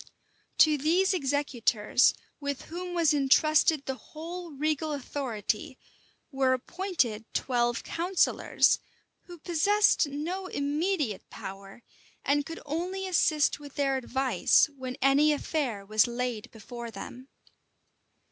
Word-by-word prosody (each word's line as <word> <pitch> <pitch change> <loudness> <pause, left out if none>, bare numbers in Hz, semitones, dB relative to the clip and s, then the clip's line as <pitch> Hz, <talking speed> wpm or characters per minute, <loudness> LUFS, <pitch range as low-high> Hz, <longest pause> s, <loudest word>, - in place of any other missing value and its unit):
To 305 -2 +5
these 360 +7 +2
executors, 265 - +2 0.2
with 285 -2 -4
whom 355 +2 -6
was 330 -3 +3
intrusted 300 +1 +3
the 265 - -2
whole 335 +6 -8
regal 305 +1 -1
authority, 255 -4 -3 0.5
were 265 -1 +2
appointed 260 - -2
twelve 240 -2 0
counsellors, 355 +2 +2 0.5
who 350 -1 -11
possessed 355 +2 +2
no 335 +7 -4
immediate 290 - -2
power, 195 +4 -9 0.4
and 285 0 +1
could 330 - -7
only 360 +6 -3
assist 310 -6 +2
with 285 -2 -12
their 275 -2 +1
advice 265 +3 +2
when 255 -2 -6
any 285 +3 +5
affair 265 -9 -2
was 215 +2 +3
laid 240 -2 -3
before 235 +2 -9
them. 240 +5 -9
285 Hz, 110 wpm, -28 LUFS, 250-325 Hz, 0.5 s, To